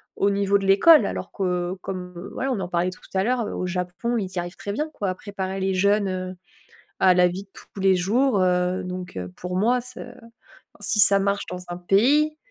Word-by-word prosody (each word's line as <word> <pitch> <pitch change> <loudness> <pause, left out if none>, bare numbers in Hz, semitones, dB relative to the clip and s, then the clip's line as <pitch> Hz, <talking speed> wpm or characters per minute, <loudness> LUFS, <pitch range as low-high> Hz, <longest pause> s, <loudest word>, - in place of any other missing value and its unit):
au 200 - +2
niveau 200 0 +2
de 195 - -4
l'école. 290 +12 +6
Alors - - -4
que 180 -2 -1
comme, 180 -2 -6 0.2
voilà, 265 +1 -2
on 235 - -1
en 180 - -4
parlait 175 0 0
tout 185 - -11
à 190 0 +1
l'heure, 245 -1 0
heu, - - -5
au 180 - -3
Japon, 180 +6 -2
ils 195 -4 -2
y 180 - -2
arrivent 175 +1 -5
très 200 - -6
bien, 300 +9 -2
quoi, 200 -2 -2
à 185 - -2
préparer 195 -1 -5
les 190 0 0
jeunes, 200 +2 +2
heu, 185 0 -4 0.6
à 185 -1 +6
la 180 0 +5
vie 185 +3 -5
de 195 - -28
tous - - -13
les 190 -1 +4
jours, 210 +4 +2
heu, 180 0 +1
donc 180 - -6
heu, 90 0 -5
pour 180 0 -4
moi, 240 +5 +2
ce 250 +1 -10 0.8
si 210 - 0
ça 200 0 +7
marche 200 +1 0
dans 180 0 -5
un 175 - -4
pays, 280 - +3
190 Hz, 225 wpm, -24 LUFS, 180-205 Hz, 0.8 s, ça